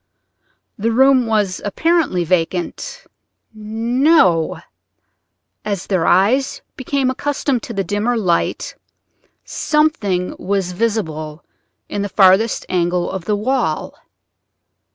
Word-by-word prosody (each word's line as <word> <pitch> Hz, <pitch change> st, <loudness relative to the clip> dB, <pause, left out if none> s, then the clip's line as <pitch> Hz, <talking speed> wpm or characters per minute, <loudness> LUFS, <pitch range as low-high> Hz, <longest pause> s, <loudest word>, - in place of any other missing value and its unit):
The 225 Hz, +3 st, 0 dB
room 260 Hz, 0 st, +4 dB
was 210 Hz, -4 st, 0 dB
apparently 295 Hz, -, +1 dB
vacant—no; 210 Hz, -, -1 dB, 1.0 s
as 200 Hz, -4 st, -3 dB
their 185 Hz, -5 st, 0 dB
eyes 230 Hz, +10 st, +2 dB
became 260 Hz, 0 st, -1 dB
accustomed 275 Hz, -2 st, -1 dB
to 235 Hz, -, -8 dB
the 195 Hz, -2 st, -1 dB
dimmer 205 Hz, +6 st, -1 dB
light 180 Hz, -6 st, -1 dB, 0.7 s
something 220 Hz, -, 0 dB
was 195 Hz, -2 st, -1 dB
visible 165 Hz, -7 st, -3 dB, 0.4 s
in 205 Hz, -, -3 dB
the 205 Hz, -, -3 dB
farthest 195 Hz, +3 st, +3 dB
angle 175 Hz, 0 st, 0 dB
of 190 Hz, -2 st, -5 dB
the 210 Hz, -, +1 dB
wall. 215 Hz, -7 st, -1 dB
205 Hz, 95 wpm, -18 LUFS, 180-250 Hz, 1.0 s, room